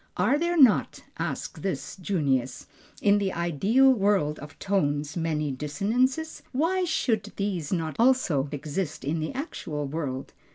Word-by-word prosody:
"Are 290 - +3
there 345 +1 0
not" 255 -7 +4 0.2
asks - - -4
this 195 - -3
Junius, 140 -9 -1 0.4
"in 205 0 +5
the 195 -2 0
ideal 195 - +3
world 195 -9 +1
of 145 0 -11
tones 150 -7 0
many 155 -3 -1
dissonances? 230 - -1
Why 350 +7 +1
should 225 -11 0
these 190 -7 -2
not 165 -4 -2
also 225 - +3
exist 150 +3 -4
in 155 +4 -1
the 155 - -2
actual 165 - -4
world?" 135 -3 -4
185 Hz, 135 wpm, -27 LUFS, 150-230 Hz, 0.4 s, in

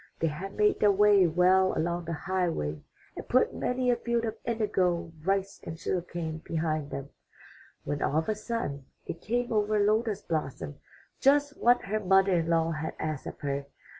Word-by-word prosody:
They 165 - +1
had 190 +6 -6
made 210 0 +3
their 210 - +5
way 200 -2 +5
well 185 +3 +3
along 170 +1 -1
the 165 - -3
highway 165 - -2 0.3
and - - -8
put - - +3
many 250 0 0
a - - +3
field 235 0 -1
of 220 - -3
indigo, 185 -7 0
rice, 195 +2 -1
and 165 - -6
sugar 180 +2 -1
cane 165 -2 -5
behind 155 -3 -2
them, 140 0 -6 0.7
when 145 0 -3
all 150 - +1
of 160 - 0
a 215 - +2
sudden 210 - -4 0.2
it 165 - -6
came 240 +1 -1
over 215 0 +2
Lotus 210 0 +1
blossom 135 - -4 0.4
just 285 +1 +3
what 245 +1 +3
her 215 +2 -1
mother 195 -1 +4
in 165 -2 +1
law 165 0 +2
had 160 0 -4
asked 155 -3 -4
of - - -8
her. 140 0 -2
185 Hz, 180 wpm, -29 LUFS, 160-215 Hz, 0.7 s, their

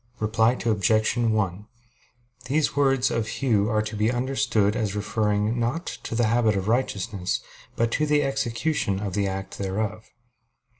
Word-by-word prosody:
Reply 110 +2 +2
Obj. 110 0 +2
1: 105 -4 0 0.8
These 145 +4 +1
words 135 -2 +2
of 115 -2 -1
Hugh 110 -5 +1
are 110 -2 +1
to 110 0 -5
be 105 +2 +1
understood 120 -5 +1
as 105 -4 -1
referring, 105 +2 0
not 120 +9 -1
to - - -6
the 120 0 +2
habit 110 -1 +2
of 95 0 -2
righteousness, 105 -5 -1 0.4
but 115 0 +1
to 155 +5 +1
the 150 0 +3
execution 135 -5 -1
of 100 -2 -4
the 100 0 0
act 95 0 -5
thereof. 105 +2 -3
110 Hz, 150 wpm, -25 LUFS, 105-120 Hz, 0.8 s, the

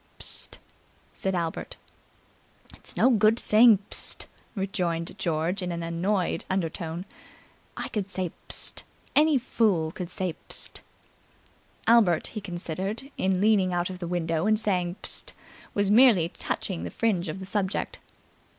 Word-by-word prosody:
"Psst!" - - -4 0.6
said 190 -1 -2
Albert. 170 -2 -3 1.0
"It's - - -10
no 260 - +5
good 215 0 +4
saying, 220 -1 +7
'Psst!'" - - +1 0.3
rejoined 175 -4 -1
George 170 +3 0
in 180 -1 -2
an 170 0 -3
annoyed 175 +3 0
undertone. 170 -1 -2 0.7
"I - - -3
could 200 -3 -3
say 185 -3 -2 0.2
'Psst!' - - -1 0.3
Any 305 -1 +5
fool 205 -10 +1
could 175 0 -6
say 185 -2 -2 0.2
'Psst!'" - - -4 1.0
Albert, 215 -8 +5
he 215 - -6
considered, 190 - -4
in 185 -1 +1
leaning 200 -3 +3
out 175 +1 0
of 180 - -8
the 175 - -4
window 165 0 0
and 215 0 +4
saying 180 -5 0
"Psst!" - - -4 0.4
was 200 -1 +2
merely 215 -8 +6
touching 180 0 -4
the - - -3
fringe 190 -7 0
of 170 - -5
the 190 - -6
subject. 195 0 -2
185 Hz, 140 wpm, -27 LUFS, 175-210 Hz, 1.0 s, saying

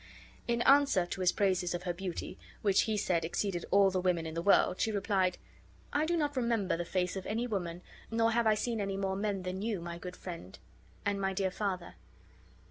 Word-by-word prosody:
In 235 0 +1
answer 275 -10 +5
to 180 +2 -5
his 180 - +4
praises 185 -3 +1
of 175 - -5
her 180 -1 -1
beauty, 180 0 -5 0.2
which 200 -2 +4
he 215 - +1
said 175 -5 +1
exceeded 175 +2 -2
all 200 -1 +5
the 185 -1 0
women 180 -3 +1
in 160 - -5
the 165 - -2
world, 185 -1 +4
she 220 - +2
replied: 195 -3 +1 0.6
"I 300 +2 +2
do 345 0 +1
not 295 -2 0
remember 230 -7 +1
the 175 +1 -3
face 180 +1 -1
of 190 - -5
any 225 +3 -1
woman, 180 -6 -3 0.3
nor 230 0 +2
have 230 0 +2
I 215 - +5
seen 225 +1 -1
any 195 -1 -2
more 190 -1 -1
men 200 -1 -2
than 185 +1 -4
you, 215 -3 -1
my 170 0 -6
good 180 +1 -7
friend, 130 - -8 0.5
and 200 -1 0
my 195 0 0
dear 190 -1 0
father. 185 -3 -3
195 Hz, 215 wpm, -32 LUFS, 180-215 Hz, 0.6 s, answer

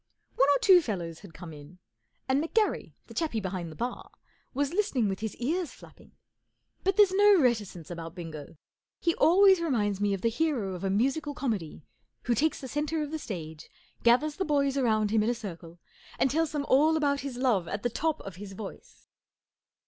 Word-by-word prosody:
One 270 +2 +4
or 285 - +5
two 370 -3 +7
fellows 175 - -4
had 185 -6 -14
come 170 -2 -9
in, 150 +4 -13 0.5
and 270 +3 +2
McGarry, 425 +6 0
the - - -13
chappie 315 -10 -1
behind 185 -4 -4
the - - -11
bar, 245 +8 -5 0.4
was 280 +3 -1
listening 350 - +1
with 195 -1 -3
his 220 -1 -4
ears 320 +7 -2
flapping. - - -17 0.7
But 390 +1 +1
there's 410 -3 +6
no 410 -1 +6
reticence 210 - 0
about 165 0 -7
Bingo. 160 -4 -8 0.4
He 335 - +1
always 380 +2 +5
reminds 210 - 0
me 205 -1 +2
of 190 - -8
the 230 - +2
hero 235 -7 -1
of 180 +1 -7
a 195 - 0
musical 275 +8 0
comedy 205 - -3 0.4
who 245 - +1
takes 300 +8 +1
the 265 - -6
centre 300 +3 -1
of 295 - -6
the 315 - -3
stage, 160 - -7 0.3
gathers 285 +6 +3
the 385 - 0
boys 280 -4 +1
round 215 -6 +1
him 220 -1 +3
in 215 - +1
a 245 - 0
circle, 170 -6 -9 0.4
and 265 - +2
tells 320 +1 +1
them 290 -2 -2
all 310 +4 +4
about 285 -2 +1
his 270 -3 -5
love 235 -9 +1
at 200 +4 -4
the 240 - +1
top 315 +5 -1
of 195 -3 -9
his 195 0 -8
voice. 195 0 -10
245 Hz, 195 wpm, -28 LUFS, 195-305 Hz, 0.7 s, two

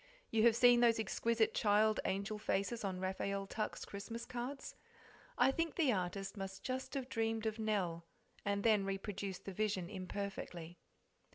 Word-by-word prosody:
You 225 - +3
have 230 - +5
seen 245 0 +7
those 235 -2 +5
exquisite 230 0 +1
child 215 0 +3
angel 200 +2 -1
faces 210 +3 -1
on 190 -2 -2
Raphael 195 +1 -2
Tuck's 215 +2 -3
Christmas 230 +4 -6
cards? 250 +3 -5 0.6
I - - +5
think 330 +3 -1
the 295 -8 +3
artist 190 +1 -2
must 195 -1 -6
just 260 +2 -3
have 265 -2 -2
dreamed 225 -2 -1
of 220 0 -1
Nell, 190 -6 0 0.4
and 200 0 0
then 215 -3 +5
reproduced 195 0 -4
the 195 - -5
vision 200 -3 -1
imperfectly. 185 -3 -5
210 Hz, 155 wpm, -37 LUFS, 195-230 Hz, 0.6 s, seen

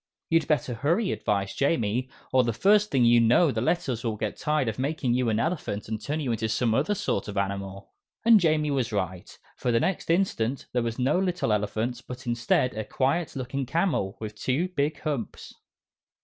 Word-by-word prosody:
"You'd 165 0 +3
better 140 -5 0
hurry," 165 - +1
advised 100 -1 -2
Jamie, 125 -3 +1 0.2
"or 130 -1 +5
the 115 -1 0
first 205 - +4
thing 130 -3 +3
you 120 0 +6
know 125 +8 +4
the 110 - -2
Letters 130 -4 -1
will 115 -3 -1
get 105 0 -3
tired 150 -4 0
of 110 +1 -3
making 135 -2 0
you 125 -1 +1
an 110 0 +1
elephant, 115 - -2
and 110 0 -4
turn 150 +7 -2
into 115 -5 -1
some 115 0 +1
other 150 - +1
sort 100 - -2
of 105 -1 -6
animal." 100 0 -3 0.3
And 230 -2 +8
Jamie 155 -4 +2
was 130 -4 0
right, 95 -3 -4 0.2
for 125 - -1
the 115 - +3
next 185 +3 -1
instant 140 -9 0
there 125 - +2
was 115 -1 -3
no 135 +7 +2
little 180 - 0
elephant, 110 +4 -2
but 125 +1 -8
instead, 120 +1 +1
a 110 - -3
quiet 145 +9 -1
looking 135 0 -3
camel, 160 - 0
with 110 -1 -5
two 135 +11 -1
big 150 -4 -1
humps. 145 -8 -4
125 Hz, 190 wpm, -26 LUFS, 110-155 Hz, 0.3 s, And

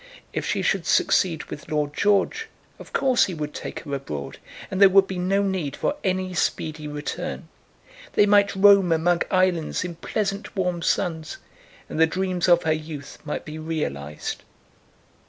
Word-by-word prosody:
If - - -2
she - - 0
should - - 0
succeed 165 -4 +2
with - - -9
Lord 150 -1 -1
George, 205 - +1 0.3
of - - -12
course 260 -2 +3
he 185 - -5
would 150 -1 -5
take - - -6
her 145 -3 -7
abroad, 75 - -5 0.3
and 190 0 -2
there 195 - +9
would 195 0 +6
be 190 -1 -5
no 195 +3 +1
need 185 -8 -2
for 290 - -1
any 185 -1 -1
speedy 155 -3 -2
return. 150 +4 -5 0.7
They 205 - +5
might 205 -1 +4
roam 195 -2 +6
among 170 +2 +2
islands 185 -4 +1
in 180 -1 -5
pleasant 200 +4 -3
warm 180 -3 -1
suns, 160 -3 -1 0.5
and - - -5
the 160 - +6
dreams 185 +1 -1
of 175 0 +5
her 160 -1 +2
youth 155 -3 -7
might 150 - -4
be 155 +1 -7
realised. 75 - -4
175 Hz, 165 wpm, -24 LUFS, 155-190 Hz, 0.7 s, there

